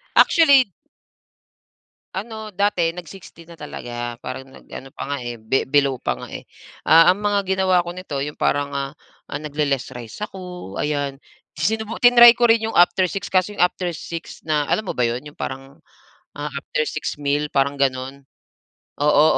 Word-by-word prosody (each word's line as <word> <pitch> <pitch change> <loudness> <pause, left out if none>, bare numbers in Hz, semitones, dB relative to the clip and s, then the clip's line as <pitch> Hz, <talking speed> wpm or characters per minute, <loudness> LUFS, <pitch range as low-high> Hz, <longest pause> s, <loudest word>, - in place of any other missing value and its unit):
Actually. 280 - +6 1.4
Ano 220 +2 -6
dati, 200 -4 +1
nag-60 170 0 -11
na 170 - -13
talaga. 120 -6 -6
Parang 130 +2 -7
nag-ano 135 0 -11
pa 140 +2 -5
nga, - - -2 0.2
be 110 +4 0
below 140 -2 +2
pa - - -1
nga, - - -8
eh. - - -6 0.4
Ah, 165 +3 +6
ang 205 - -10
mga 205 -1 +1
ginawa 185 -2 +2
ko 175 - -5
nito, 180 -6 -6
yong 145 +2 -3
parang, 145 0 0
ah, 140 +1 -3 0.4
nagle-less 140 -3 -2
rice 120 -2 -9
ako 180 - -9
ayan. 145 -2 -2 0.3
Sinubuk 220 +8 -2
tinry 240 -1 +9
ko 240 0 +2
rin 225 -1 +4
yong 225 - -4
after 180 +1 +4
6:00, 195 +3 -4
kaso 185 +2 +1
yong - - -3
after 180 -1 +1
6:00 165 +1 -8
na 150 -2 0
alam 215 +5 -1
mo - - -3
ba 125 - +3
'yon, 120 +2 -2
yong 150 0 -13
parang, 135 +1 -6 0.6
ah, 150 +1 -4
after 140 +2 -2
6:00 - - -3
meal, 145 +1 0
parang 140 0 +1
gano'n? 135 0 -2 0.8
Oo, 150 0 +5
155 Hz, 165 wpm, -21 LUFS, 140-190 Hz, 1.4 s, tinry